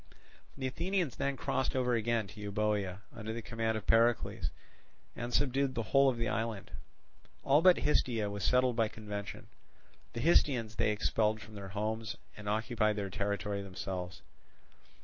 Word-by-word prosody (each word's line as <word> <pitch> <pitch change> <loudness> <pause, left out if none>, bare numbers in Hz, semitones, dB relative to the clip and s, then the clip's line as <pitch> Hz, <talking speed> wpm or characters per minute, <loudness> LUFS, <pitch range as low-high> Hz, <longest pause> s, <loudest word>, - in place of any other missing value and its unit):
The 135 - -3
Athenians 170 - -1
then 140 -1 -1
crossed 130 +2 -1
over 125 -1 +2
again 115 -1 +1
to 105 0 -10
Euboea 105 -2 -1
under 110 -1 -5
the 115 - -4
command 115 0 -1
of 110 - -6
Pericles, 115 +1 +3 0.7
and 120 0 -4
subdued 135 0 +1
the 115 - -1
whole 135 0 +7
of 125 - -1
the 115 0 -1
island: 110 -3 -2 0.7
all 145 +3 +5
but 180 0 +7
Histiaea 120 -7 +1
was 100 -1 -4
settled 125 +5 +3
by 115 -1 +3
convention; 105 -2 -6 0.7
the 115 - -3
Histiaeans 125 -8 +3
they - - +3
expelled 105 +1 +1
from 110 0 -12
their 100 -2 -7
homes, 110 +1 -2 0.2
and 105 -1 -6
occupied 110 0 +1
their 100 -2 -3
territory 100 +1 -2
themselves. 90 -1 -5
110 Hz, 155 wpm, -33 LUFS, 105-125 Hz, 0.7 s, whole